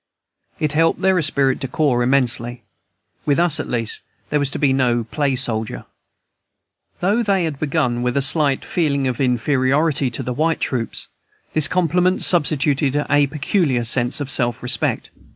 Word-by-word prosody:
It 150 -1 0
helped 165 +2 +2
their 190 -1 +3
esprit 140 -4 +1
de 135 - -4
corps 130 -2 +1
immensely. 120 -2 0 0.6
With 145 -2 +1
us, 170 -3 +2
at - - -4
least, 115 -2 -2 0.3
there 150 - +2
was 140 -2 0
to - - -5
be 140 -3 +2
no 120 -3 +1
play 140 +4 -1
soldier. 115 -4 0 1.2
Though 205 +6 +2
they 200 -5 +1
had 155 -4 -3
begun 140 -6 -1
with 125 +2 -1
a - - +2
slight 140 -1 +2
feeling 140 -5 0
of 130 0 -2
inferiority 135 +3 +1
to 120 +3 -5
the 125 0 -3
white 160 +5 0
troops, 120 -4 -2 0.5
this 155 -2 +2
compliment 180 +2 +1
substituted 145 -4 +2
a 145 0 +3
peculiar 140 - 0
sense 120 +3 +1
of 140 -2 -4
self 120 -1 -1
respect. 125 - -2
140 Hz, 160 wpm, -20 LUFS, 125-155 Hz, 1.2 s, their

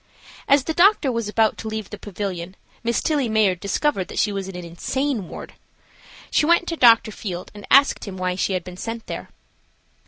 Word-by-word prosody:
As 280 -1 +5
the 320 - -2
doctor 350 -5 +4
was 230 -3 -2
about 220 0 +2
to 220 - -6
leave 220 -2 -5
the 210 - -7
pavilion 190 -3 -5 0.3
Miss 235 0 0
Tillie 290 -7 +1
Mayard 210 -5 +2
discovered 200 0 0
that - - -9
she 210 - +2
was 195 -1 -4
in 190 - -8
an 180 -1 -6
insane 225 - -2
ward. - - -9 0.8
She - - +3
went 345 +1 +3
to 335 - -2
Dr. 230 -5 +5
Field 185 -4 -6
and 205 -1 -11
asked 280 +1 +5
him 195 -3 -7
why 185 0 -1
she 190 +1 -1
had 185 -1 -1
been 180 0 -10
sent 225 +3 -5
there. - - -6
215 Hz, 200 wpm, -22 LUFS, 185-260 Hz, 0.8 s, As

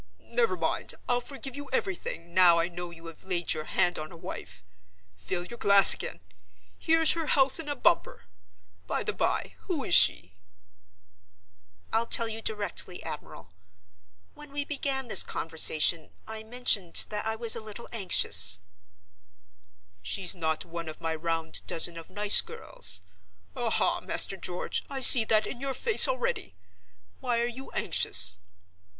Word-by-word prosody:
Never 470 -2 -1
mind, - - -3
I'll 245 0 -1
forgive 270 0 -9
you 285 -1 -10
everything, 170 -7 -5
now 175 -2 +4
I 170 +1 -1
know 175 0 -8
you 170 0 -15
have 165 -1 -13
laid 175 -3 -2
your 155 -1 -7
hand 175 +1 -1
on 155 0 -9
a 170 - -14
wife. 160 - -11 0.5
Fill 95 - -6
your 235 +4 -12
glass 200 -1 +7
again. 85 - -7 0.6
Here's 325 -1 +3
her 330 -2 -3
health 270 0 0
in 310 -2 -6
a 290 - -4
bumper. 175 - -1 0.6
By - - -4
the - - -5
by, - - -3
who - - -4
is - - -2
she?" 90 +2 +2 1.6
"I'll 230 +1 -1
tell 230 - +1
you 225 0 -8
directly, 210 -4 -5
admiral. 90 - -10 0.8
When 295 0 -15
we 285 0 -5
began 275 -3 -4
this - - +8
conversation, 160 0 +1 0.2
I 220 0 -7
mentioned 220 -6 +1
that 210 +1 -5
I 220 - -3
was 230 0 +2
a 230 - -7
little 215 +2 -10
anxious—" 190 - +4 1.4
"She's 175 - 0
not 160 -3 -4
one 170 -1 -9
of 155 - -11
my 165 -1 -4
round 165 0 -3
dozen 170 +1 +3
of 165 -1 -12
nice 205 0 +7
girls—aha, 90 +1 -4
Master 195 - +3
George, 180 -2 -6
I 275 -1 -6
see 245 -3 +8
that 215 -1 +1
in 240 - -8
your 275 -1 -4
face 450 - +7
already! - - -5 0.6
Why 245 -3 -3
are 235 - -1
you 245 +3 -9
anxious?" 90 0 +2
200 Hz, 155 wpm, -26 LUFS, 165-245 Hz, 1.6 s, this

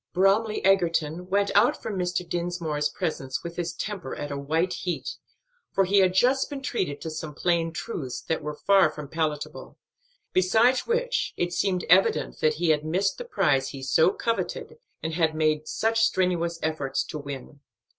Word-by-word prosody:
Bromly 200 +4 +3
Egerton 175 -2 +1
went 200 +1 +2
out 210 +5 +4
from 210 - -5
Mr. 180 -1 -2
Dinsmore's 170 -4 -1
presence 135 -7 -3
with 170 0 -6
his 175 -1 -2
temper 180 -4 -5
at 145 0 -5
a - - -2
white 160 +6 0
heat, 185 - -4 0.5
for 195 - +2
he 200 +2 +4
had 185 -1 +3
just 260 +6 +3
been 275 -2 -6
treated 185 - -2
to 160 - -5
some 155 -1 -6
plain 170 0 +1
truths 150 - -5
that 160 - -2
were 150 0 -5
far 195 0 +4
from 150 -1 -8
palatable; 155 -1 -3 0.6
besides 220 +8 +3
which 485 +1 0
it 175 0 -1
seemed 185 -1 0
evident 185 +3 +3
that 155 -1 +2
he 170 +1 0
had 150 -1 +3
missed 185 +5 0
the - - -5
prize 135 - +1
he 135 -1 -8
so 140 +6 +4
coveted 230 - -3 0.2
and 160 0 -2
had 160 -1 +1
made 155 -1 +1
such 225 +1 0
strenuous 175 -5 +1
efforts 155 -4 -1
to 155 - -6
win. 140 0 -8
175 Hz, 175 wpm, -26 LUFS, 155-195 Hz, 0.6 s, out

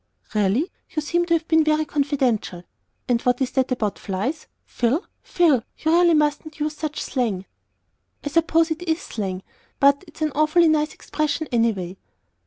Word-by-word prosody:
"Really! 215 - +1 0.2
You 310 - -2
seem 345 +3 0
to 335 - +4
have 325 -1 -2
been 320 -1 +4
very 310 0 +2
confidential. 265 - -1 0.4
And 235 -2 +1
what 250 0 +1
is 265 -2 0
that 260 -1 0
about 215 -5 -1
flies? 220 +11 -3 0.2
Phil, 245 - 0 0.2
Phil, 320 -9 +3 0.2
you 315 - 0
really 340 0 +5
mustn't 300 +1 0
use 300 0 -2
such 305 -1 -4
slang." 215 -8 -2 0.8
"I 290 - -2
suppose 330 +1 +2
it 320 +2 -2
is 320 +1 +1
slang; 195 - -5 0.4
but 280 +3 +4
it's 315 0 -7
an 305 - 0
awfully 310 +3 +4
nice 305 0 +1
expression 305 0 -2
anyway." 205 -6 0
295 Hz, 165 wpm, -23 LUFS, 235-315 Hz, 0.8 s, really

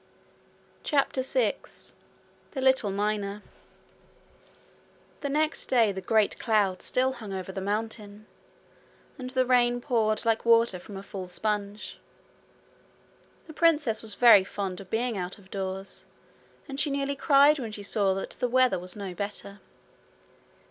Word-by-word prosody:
CHAPTER 275 -3 +1
6 - - -2 0.6
The 265 - -3
Little 260 -5 +3
Miner 205 0 -2 1.8
The 285 - -3
next 305 +2 0
day 230 -5 +3
the 190 -1 -6
great 215 +2 +1
cloud 205 -5 +1
still 260 +1 0
hung 220 -5 -9
over 190 -1 -5
the 190 - -5
mountain, 210 +1 -4 0.9
and 255 -1 -5
the 255 0 +1
rain 245 -1 +3
poured 225 -4 0
like 225 -1 +1
water 230 -4 +4
from 195 +2 -10
a 195 - -8
full 195 -2 -7
sponge. 205 +2 -3 1.5
The 315 - -11
princess 295 -10 +2
was 215 -2 -3
very 230 -5 +7
fond 190 -1 -5
of 190 - -13
being 235 0 -1
out 180 +3 -5
of 195 -2 -20
doors, 190 0 -5 0.6
and 275 -1 -6
she 305 - +2
nearly 280 0 -1
cried 285 +1 +5
when 230 -4 -5
she 210 -1 -7
saw 200 -1 +1
that 195 - -5
the 250 - -2
weather 255 -6 +3
was 180 0 -5
no 200 -3 -6
better. 200 +1 -6
215 Hz, 140 wpm, -27 LUFS, 200-255 Hz, 1.8 s, very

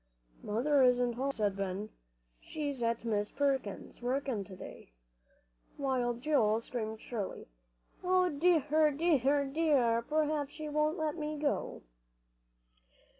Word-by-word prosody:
"Mother 265 +7 +2
isn't 245 -1 +4
home," 265 +4 -1
said 210 -6 -1
Ben. 195 +2 -3 0.5
"She's 285 -4 -4
at 230 0 0
Miss 210 -2 0
Perkins' 270 -9 -2
working, 250 -3 -1
to 190 - -10
day." - - -11 0.8
While 255 -4 0
Joel 235 -5 +2
screamed 220 -2 -5
shrilly, 215 -5 -5 0.6
"Oh, 365 0 +3
dear 310 -1 +3
dear 285 -2 +2
dear, 270 -6 +2
p'r'aps 300 +1 0
she 310 -1 -6
won't 305 +3 +1
let 315 -1 -1
me 305 -1 -3
go!" 290 -1 -2
275 Hz, 120 wpm, -32 LUFS, 230-300 Hz, 0.8 s, isn't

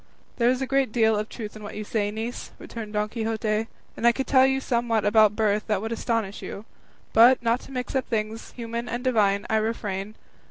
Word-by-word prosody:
"There 235 0 +3
is 255 +1 +1
a - - 0
great 270 -2 +1
deal 220 -1 +3
of 210 +1 -2
truth 215 -3 -7
in 215 - -10
what 205 - -8
you 215 - -4
say, 205 -1 -1
niece," 225 +3 -5
returned 220 -2 -8
Don 210 0 0
Quixote, 220 -1 -1 0.3
"and 235 - +1
I - - +8
could 265 +3 -3
tell 260 -1 +5
you 265 0 +1
somewhat 235 -4 0
about 210 0 +5
birth 215 -1 +1
that 210 -3 +1
would 225 +3 -4
astonish 225 -3 -2
you; 200 - -7 0.5
but, 240 +3 +6
not 235 +1 +2
to - - -14
mix 250 -1 -4
up 265 -1 0
things 220 0 -3
human 235 0 -5
and 240 +1 -3
divine, 205 -6 +2
I 220 - +2
refrain. 215 -2 -3
225 Hz, 215 wpm, -25 LUFS, 215-240 Hz, 0.5 s, I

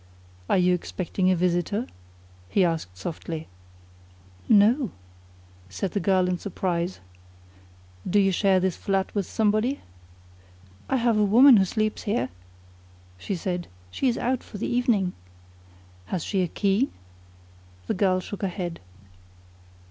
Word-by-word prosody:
"Are - - +4
you 180 0 +4
expecting 185 +1 -1
a 185 - +4
visitor?" 180 +5 0 0.6
he 190 - +3
asked 160 - -3
softly. 160 - -5 1.0
"No," 225 +4 +5 0.8
said 180 - -3
the 205 - -1
girl 185 -2 +2
in 180 -1 -1
surprise. 180 -2 -2 1.1
"Do 205 - +4
you 195 -1 +3
share 190 0 +3
this 185 -1 0
flat 195 -1 -1
with 200 -3 -1
somebody?" 220 +5 +1 1.1
"I - - +2
have 235 -3 +2
a - - +4
woman 240 +5 +7
who 190 - +4
sleeps 215 +3 -1
here," 205 - 0 0.9
she 195 - -3
said. 175 0 -3 0.2
"She 260 - 0
is 240 - +1
out 255 0 0
for 210 - -10
the - - -3
evening." 230 -7 +1 0.9
"Has 180 - -3
she 195 -3 0
a 180 - +1
key?" 200 - +1 1.0
The - - -1
girl 185 -1 +2
shook 200 +2 -7
her 195 - +1
head. 175 -2 -5
195 Hz, 135 wpm, -25 LUFS, 180-215 Hz, 1.1 s, woman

